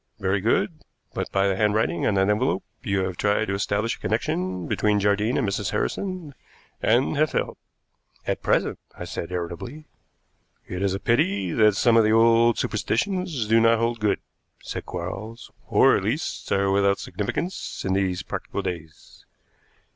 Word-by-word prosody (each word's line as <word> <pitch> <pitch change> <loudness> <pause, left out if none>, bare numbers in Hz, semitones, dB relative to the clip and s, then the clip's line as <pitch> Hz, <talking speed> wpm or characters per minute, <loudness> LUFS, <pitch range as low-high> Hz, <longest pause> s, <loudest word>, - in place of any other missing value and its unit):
Very 95 +1 0
good, 150 - +1 0.3
but - - -3
by 95 0 +2
the 95 - +1
handwriting 105 -5 +1
on 100 - +2
that 95 0 +3
envelope 105 0 +1 0.2
you 100 -1 0
have 95 -1 -3
tried 105 +1 +1
to 100 - -2
establish 100 +3 0
a - - -22
connection 90 -1 -1
between 105 -1 +2
Jardine 105 +4 +1
and 120 - +1
Mrs. 100 0 -1
Harrison, 185 -7 -3 0.5
and 125 +6 +2
have 155 +1 +3
failed." - - -2 0.7
"At - - -2
present," - - +1 0.2
I - - -6
said 85 - -5
irritably. 90 - -5 0.8
"It 90 +1 -5
is 95 -1 +1
a - - -4
pity 100 -5 +1
that 105 0 +4
some 115 +3 +4
of 115 - +6
the 110 0 +3
old 115 +1 +5
superstitions 145 - -1
do 115 +1 +5
not 115 0 +5
hold 115 +1 0
good," 105 -1 +2 0.5
said - - -6
Quarles, 95 +6 -6 0.2
"or - - +5
at - - -1
least - - -3
are 100 0 +2
without 100 0 +3
significance 170 - -4
in 95 - +1
these 95 -2 0
practical 100 - -4
days. 85 -4 -8
105 Hz, 165 wpm, -24 LUFS, 95-115 Hz, 0.8 s, of